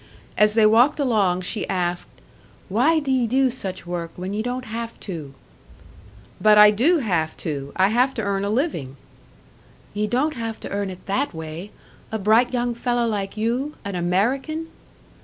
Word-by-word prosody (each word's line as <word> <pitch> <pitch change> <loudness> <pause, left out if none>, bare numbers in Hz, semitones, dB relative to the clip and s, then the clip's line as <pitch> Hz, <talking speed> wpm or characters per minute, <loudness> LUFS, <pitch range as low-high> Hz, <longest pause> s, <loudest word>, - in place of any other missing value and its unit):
As 210 0 +3
they 220 -1 +5
walked 240 +8 +4
along 205 -9 +2
she 205 +4 -2
asked, 175 -1 -1 0.6
"Why 255 - +3
do 280 -3 -2
ye 255 -3 +2
do 260 +2 +2
such 190 -7 -6
work, 175 -1 -4
when 185 +2 -5
ye 210 - -1
don't 250 +2 -3
have 230 0 -6
to?" 155 -8 -7 1.1
"But 215 0 +6
I 210 0 +9
do 270 - +3
have 175 - -1
to! 140 -3 -4
I 190 +1 +3
have 250 +4 +2
to 225 - -2
earn 200 -1 -1
a 200 - -1
living!" 210 - -2 1.0
"Ye 210 +1 -1
don't 265 +8 0
have 225 -4 -5
to - - -6
earn 200 -1 -2
it 185 -1 -10
that 200 +2 -1
way! 160 +4 -7 0.4
A 220 - -1
bright 220 +4 +3
young 245 -1 0
fellow 240 0 0
like 205 -2 -3
you 245 +7 -1
an 200 - -4
American!" 250 - -1
215 Hz, 175 wpm, -23 LUFS, 185-250 Hz, 1.1 s, I